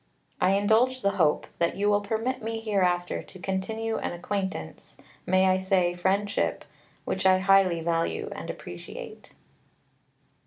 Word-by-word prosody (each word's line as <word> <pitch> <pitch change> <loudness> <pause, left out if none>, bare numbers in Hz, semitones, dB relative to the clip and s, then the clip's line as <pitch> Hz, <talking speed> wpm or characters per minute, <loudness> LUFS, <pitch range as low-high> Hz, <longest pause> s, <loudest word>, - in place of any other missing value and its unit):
I 185 - +4
indulge 225 +6 +2
the 200 - +3
hope 150 -2 +3
that 170 - +1
you 205 +1 0
will 205 0 +3
permit 230 +5 -2
me 225 0 -3
hereafter 185 -5 0
to - - -13
continue 220 +5 -2
an - - -3
acquaintance 190 - -5 0.3
(may 185 +1 +4
I 185 0 +3
say 185 -2 +2
friendship?) 195 +3 0 0.4
which 190 - -2
I 185 0 +6
highly 190 -3 +4
value 165 0 -1
and - - -7
appreciate. 85 0 -9
190 Hz, 140 wpm, -27 LUFS, 180-210 Hz, 0.4 s, I